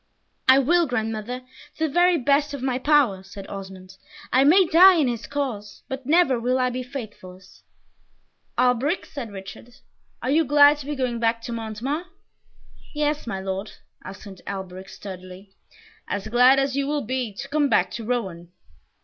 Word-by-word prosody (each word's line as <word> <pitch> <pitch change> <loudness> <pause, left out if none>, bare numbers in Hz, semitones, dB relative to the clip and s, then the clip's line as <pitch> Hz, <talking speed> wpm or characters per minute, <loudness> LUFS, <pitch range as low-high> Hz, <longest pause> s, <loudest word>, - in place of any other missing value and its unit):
"I 260 +1 +8
will, 335 +5 +3
grandmother, 225 0 -3 0.4
to 320 - 0
the 280 - -8
very 350 0 +4
best 285 +2 +1
of 265 - -8
my 255 -1 -1
power," 270 -10 +3
said 195 +1 -11
Osmond; 190 -1 -9 0.4
"I 260 - +5
may 360 +7 +6
die 360 +3 +7
in 305 -5 +2
his 235 -2 -4
cause, 225 -8 -4
but 265 -1 -6
never 295 -6 +3
will 250 +2 0
I 255 -1 +1
be 255 +1 -4
faithless!" 210 -8 -10 1.0
"Alberic!" 250 +7 +1
said 245 -7 -7
Richard, 200 +5 -10 0.5
"are 260 - 0
you 320 +3 +4
glad 290 +1 +6
to 280 - -9
be 295 - -3
going 250 -3 -2
back 230 0 +1
to 235 - -6
Montemar?" 230 +9 -4 0.9
"Yes, 295 -2 -1
my 195 -4 -3
Lord," 195 +2 -5 0.3
answered 190 0 -10
Alberic, 190 -1 -7
sturdily, 185 0 -10 0.5
"as 205 +1 -4
glad 250 +3 +5
as 275 0 0
you 280 0 -1
will 295 0 -1
be 255 -1 -2
to 275 - -7
come 290 0 +1
back - - +2
to 230 - -6
Rouen." 190 -8 -4
250 Hz, 165 wpm, -23 LUFS, 205-285 Hz, 1.0 s, I